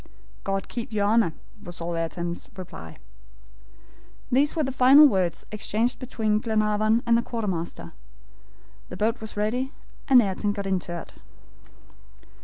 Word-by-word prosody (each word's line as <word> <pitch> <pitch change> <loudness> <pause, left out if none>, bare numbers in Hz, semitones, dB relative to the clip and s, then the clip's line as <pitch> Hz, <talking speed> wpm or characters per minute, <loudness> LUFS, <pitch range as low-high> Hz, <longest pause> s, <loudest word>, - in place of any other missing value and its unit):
"God 195 -1 -2
keep 235 -1 -6
your 205 -2 +1
Honor," 215 -4 +3 0.3
was 175 -3 -6
all 170 0 -3
Ayrton's 170 +1 -4
reply. 80 - -9 1.3
These 275 +4 +3
were 315 - +1
the 270 - -1
final 265 +4 +8
words 185 - 0
exchanged 215 +3 -1
between 220 -5 0
Glenarvan 215 0 +1
and 235 -1 +4
the 235 - +3
quartermaster. 200 -9 -4 1.0
The 180 - -7
boat 220 +4 0
was 220 -1 -8
ready 245 +6 -1 0.3
and 260 -3 +7
Ayrton 205 -1 0
got 200 -1 -5
into 180 -3 -2
it. - - -12
215 Hz, 135 wpm, -25 LUFS, 185-235 Hz, 1.3 s, final